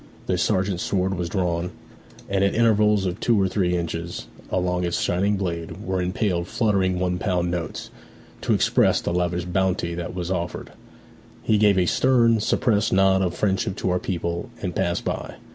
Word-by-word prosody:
The - - 0
sergeant's 95 -1 0
sword 95 -1 0
was 85 -1 -3
drawn, 90 -2 -1 0.6
and 95 0 +1
at 100 - +1
intervals 105 -3 +3
of 90 +1 -2
two 115 -3 +2
or 95 - +3
three 90 -2 0
inches 85 0 -4 0.2
along 90 -1 0
its 85 -1 -1
shining 100 +4 +1
blade 85 +1 -4
were 95 0 -1
impaled 90 -1 -1
fluttering 95 -5 +1
one 90 0 -1
pound 90 -3 0
notes, 85 -2 -4 0.5
to - - +2
express - - +3
the - - -3
lavish 90 0 -1
bounty 90 -1 0
that 85 +1 -5
was 90 0 -3
offered. 85 -2 -3 0.7
He 110 -1 +2
gave 105 -2 +4
a 90 - +3
stern, 115 +1 +3
suppressed 105 0 +1
nod 95 0 +4
of 90 -2 -1
friendship 95 0 0
to 95 - -1
our 90 - +1
people, 85 -1 -3
and 90 -4 -4
passed 85 0 -1
by. - - -4
90 Hz, 175 wpm, -23 LUFS, 90-100 Hz, 0.7 s, gave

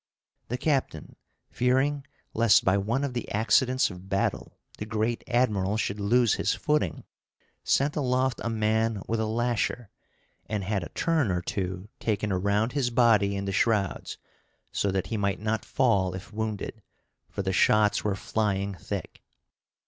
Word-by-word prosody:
The 125 - -2
captain, 130 - -1 0.4
fearing 135 +3 +1 0.3
lest 115 -2 +4
by 95 - +4
one 110 +8 0
of 140 -3 -2
the 120 - -4
accidents 115 +4 +2
of 90 +1 -11
battle 100 0 -1 0.2
the 105 - -4
great 110 +2 -1
admiral 105 -5 +1
should 105 -1 -2
lose 115 +3 +3
his - - 0
footing, 150 - 0 0.6
sent 140 +2 +2
aloft 130 -2 0
a 115 - -1
man 110 -1 0
with 115 0 -1
a 110 - 0
lasher, 120 0 -1 0.6
and 105 -1 -2
had 100 0 -1
a 85 - -7
turn 160 -9 +1
or 90 -1 0
two 95 +1 -3
taken 105 -1 -1
around 100 +5 +1
his 135 -3 0
body 115 -5 +3
in 100 0 -3
the 100 - -2
shrouds, 100 -1 0 0.5
so 100 - 0
that 95 -1 -1
he - - 0
might 100 -2 0
not 110 0 -1
fall 100 -8 +1
if 95 +3 -9
wounded; 110 0 -4 0.5
for 100 - -4
the 95 0 -1
shots 105 +2 +3
were 105 -2 0
flying 100 -1 -1
thick. 90 - -6
110 Hz, 155 wpm, -27 LUFS, 100-120 Hz, 0.6 s, lest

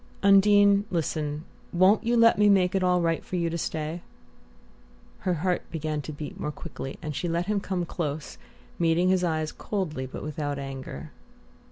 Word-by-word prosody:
"Undine, 200 0 +6
listen: 155 -3 -2 0.3
won't 190 +5 +4
you 235 +1 +2
let 230 -2 +5
me 210 0 +6
make 185 -2 +4
it 195 - +1
all 180 -1 +3
right 165 -1 0
for - - -6
you 170 -2 0
to - - -3
stay?" 160 +2 -3 1.2
Her 185 -3 0
heart 180 +3 -1
began 155 -2 -2
to 155 - -7
beat 150 0 -7
more 150 - -2
quickly, 145 -3 -7
and 150 -1 -4
she 170 +6 -2
let 170 +1 0
him 210 +1 0
come 185 -3 -2
close, 155 -3 -4 0.4
meeting 170 +2 +3
his 185 -1 +2
eyes 155 -2 0
coldly 155 -10 -3
but 130 - -8
without 145 -1 -3
anger. 135 - -7
170 Hz, 175 wpm, -27 LUFS, 150-190 Hz, 1.2 s, Undine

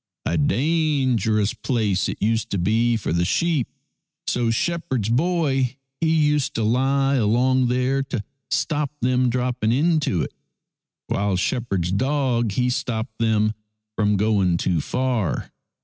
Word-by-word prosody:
A 85 - 0
dangerous 130 - +1
place 105 -7 0
it - - -5
used 110 +2 0
to 100 - -1
be 115 +6 +2
for 100 - -3
the 85 +1 +1
sheep, 155 - +1 0.6
so 120 -2 0
shepherd's 130 - -1
boy 135 -2 +1 0.2
he 165 - +1
used 150 -4 +2
to 115 - 0
lie 135 +4 +2
along 125 +3 +2
there 130 +2 +1
to 125 -6 -4 0.3
stop 150 -2 0
them 125 0 +2
dropping 125 -2 0
into 145 - +1
it, - - -6 0.7
while 100 -1 0
shepherd's 95 -5 -1
dog 125 -1 0
he 125 +3 +1
stopped 110 -3 -3
them 110 -1 +2 0.4
from 105 -2 +2
going 100 -4 +2
too 85 -2 0
far. 125 - -1
120 Hz, 135 wpm, -22 LUFS, 105-135 Hz, 0.7 s, be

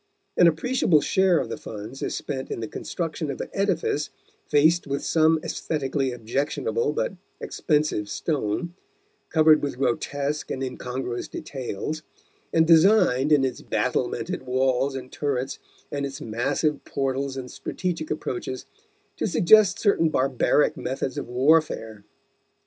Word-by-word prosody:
An 175 - +6
appreciable 170 0 +3
share 190 +1 +3
of - - -1
the - - -5
funds 110 +5 -8
is - - -2
spent 130 -1 -4
in - - -4
the 110 - -4
construction 165 +4 -4
of - - -4
an - - -4
edifice 175 -6 0 0.4
faced 160 +3 +3
with 140 0 -2
some 160 0 +3
aesthetically 135 -3 -2
objectionable 140 - -1
but - - -1 0.3
expensive 150 -9 0
stone, 150 - -2 0.6
covered 155 -1 +5
with 140 -3 -3
grotesque 140 +3 -1
and 135 - -3
incongruous 125 -1 -4
details, 135 +3 -5 0.5
and 160 0 +4
designed, 160 - +5
in 140 -3 +5
its 130 - -3
battlemented - - -1
walls 130 +1 +1
and 130 -1 -7
turrets 135 -2 -2 0.3
and 140 -1 -2
its 140 0 -4
massive 140 +5 -1
portals 135 0 -2
and 125 -1 -6
strategic 170 -4 -4
approaches, 130 -3 -4 0.5
to - - 0
suggest 200 +2 +5
certain 200 -7 +3
barbaric 135 +2 +2
methods 130 -3 -3
of - - -6
warfare. 125 -5 +1
145 Hz, 130 wpm, -25 LUFS, 130-160 Hz, 0.6 s, An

